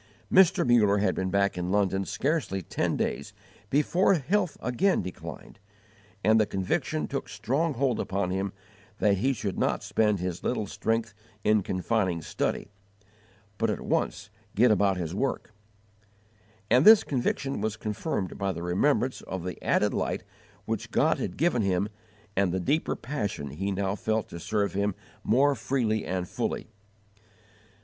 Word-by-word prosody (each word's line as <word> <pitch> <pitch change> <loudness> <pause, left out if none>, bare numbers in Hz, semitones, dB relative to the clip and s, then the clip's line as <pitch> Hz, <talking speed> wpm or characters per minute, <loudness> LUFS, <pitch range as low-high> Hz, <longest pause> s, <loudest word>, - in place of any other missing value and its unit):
Mr. 190 -2 +6
Muller 105 -4 +5
had 100 -2 +2
been 95 0 -2
back 100 -1 +1
in 90 0 -2
London 95 -1 +1
scarcely 135 - -1
ten - - -1
days - - -2 0.4
before 170 - +3
health 180 +3 0
again 185 +11 +1
declined, 90 - -8 0.6
and 110 +3 +5
the 110 - +3
conviction 95 +11 -1
took 140 - -4
strong 130 +10 -1
hold 125 -3 +1
upon 95 -1 -1
him 95 +1 -1 0.5
that 100 -2 +3
he 135 +7 +2
should 105 -7 -3
not - - 0
spend 105 -2 +2
his 90 -1 -4
little 115 -4 -1
strength 115 +2 -1 0.3
in 105 0 +4
confining 95 -1 0
study, 80 - -3 0.9
but 115 0 +2
at 105 - -1
once - - -1 0.2
get 120 +3 +5
about 100 -2 +3
his 85 -2 -3
work; 115 +1 -2 1.2
and 125 +3 +6
this 220 +2 +9
conviction 135 -2 -1
was 110 +1 -2
confirmed 105 - -3
by 100 -1 0
the 85 -2 -6
remembrance 125 +9 +1
of 95 -2 -4
the 90 -1 -6
added - - +2
light - - -2 0.4
which - - -3
God - - +2
had 90 - -4
given 155 -6 +2
him 100 0 +1 0.5
and 95 -2 +2
the 95 - -1
deeper 145 - 0
passion 105 - -4
he 95 +7 -3
now 95 0 -1
felt 110 +1 -1
to 85 - -7
serve 105 +3 -1
Him 100 0 0 0.3
more 140 +5 +4
freely 115 -6 -1
and 90 -1 -2
fully. - - -3
105 Hz, 155 wpm, -27 LUFS, 95-130 Hz, 1.2 s, this